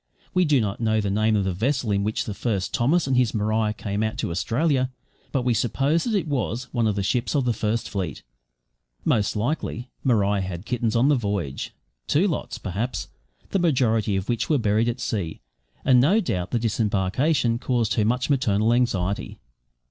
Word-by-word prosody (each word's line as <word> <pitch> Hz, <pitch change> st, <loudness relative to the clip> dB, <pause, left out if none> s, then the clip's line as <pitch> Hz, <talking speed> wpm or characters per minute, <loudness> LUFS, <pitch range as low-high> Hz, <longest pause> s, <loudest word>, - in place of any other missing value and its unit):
We 180 Hz, -1 st, +3 dB
do 150 Hz, -4 st, +4 dB
not 105 Hz, -1 st, -2 dB
know 110 Hz, -1 st, +2 dB
the 100 Hz, -2 st, -1 dB
name 110 Hz, +2 st, +2 dB
of 100 Hz, -, +2 dB
the 95 Hz, -1 st, -1 dB
vessel 120 Hz, +4 st, 0 dB
in 100 Hz, 0 st, +1 dB
which 110 Hz, +1 st, -1 dB
the 105 Hz, -, -4 dB
first 100 Hz, -3 st, -2 dB
Thomas 150 Hz, +8 st, +2 dB
and 135 Hz, -1 st, +1 dB
his 125 Hz, -3 st, +2 dB
Maria 110 Hz, 0 st, +1 dB
came 105 Hz, -1 st, -3 dB
out 110 Hz, 0 st, -1 dB
to -, -, -2 dB
Australia, 130 Hz, -, +1 dB, 0.4 s
but 130 Hz, -, 0 dB
we 125 Hz, -1 st, +2 dB
suppose 135 Hz, +8 st, +1 dB
that 230 Hz, -3 st, 0 dB
it 185 Hz, -5 st, 0 dB
was 125 Hz, -4 st, -1 dB
one 120 Hz, -3 st, +2 dB
of 105 Hz, -, 0 dB
the 100 Hz, -, -1 dB
ships 120 Hz, +8 st, 0 dB
of 140 Hz, -3 st, +2 dB
the 120 Hz, -, +2 dB
First 110 Hz, +1 st, -1 dB
Fleet. 90 Hz, -8 st, -4 dB, 0.8 s
Most 105 Hz, 0 st, +1 dB
likely 120 Hz, +1 st, -2 dB
Maria 105 Hz, -5 st, +2 dB
had 95 Hz, 0 st, -5 dB
kittens 115 Hz, -2 st, -1 dB
on 125 Hz, +5 st, +4 dB
the 150 Hz, -, +5 dB
voyage 100 Hz, -, -3 dB, 0.4 s
two 175 Hz, +8 st, +3 dB
lots, 170 Hz, -, -3 dB
perhaps 105 Hz, +6 st, -3 dB, 0.4 s
the 195 Hz, -, +2 dB
majority 115 Hz, -, +2 dB
of 95 Hz, 0 st, -2 dB
which 120 Hz, -2 st, -1 dB
were 155 Hz, -, +4 dB
buried 110 Hz, 0 st, +2 dB
at 120 Hz, +2 st, -3 dB
sea; 100 Hz, -10 st, -3 dB, 0.5 s
and 125 Hz, -2 st, +6 dB
no 185 Hz, -, +4 dB
doubt 90 Hz, -, -2 dB
the 120 Hz, -, 0 dB
disembarkation 115 Hz, -, +1 dB
caused 120 Hz, -4 st, 0 dB
her 110 Hz, -, +2 dB
much 125 Hz, +4 st, +1 dB
maternal 115 Hz, -6 st, +2 dB
anxiety. 100 Hz, -6 st, 0 dB
115 Hz, 195 wpm, -24 LUFS, 105-130 Hz, 0.8 s, and